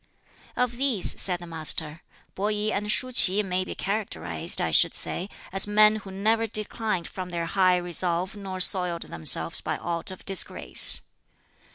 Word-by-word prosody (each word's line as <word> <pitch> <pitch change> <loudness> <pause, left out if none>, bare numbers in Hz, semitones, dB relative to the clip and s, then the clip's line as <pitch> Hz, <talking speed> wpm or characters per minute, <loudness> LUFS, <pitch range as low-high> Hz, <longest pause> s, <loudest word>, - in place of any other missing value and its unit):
"Of 245 -1 -1
these," 255 -7 +3
said 180 -2 +2
the 175 - -10
Master, 160 -1 -1 0.3
"Peh - - -10
I 210 - +1 0.2
and 210 +1 -2
Shuh 255 +3 -2
Ts'i 205 -4 +4
may 185 -1 -2
be - - -7
characterized, 85 - -1
I - - -1
should - - +3
say, 185 +3 -2 0.2
as 195 +1 0
men 215 +1 +4
who 200 -2 -10
never 220 +4 0
declined 215 -3 -3
from 185 -1 -7
their 170 -1 -3
high 185 +1 +2
resolve 175 +2 -2
nor 195 -2 -7
soiled 180 -2 +1
themselves 80 -1 -1
by - - -3
aught 170 +1 -4
of 185 - -11
disgrace. 195 -1 +3
190 Hz, 165 wpm, -25 LUFS, 175-210 Hz, 0.3 s, Ts'i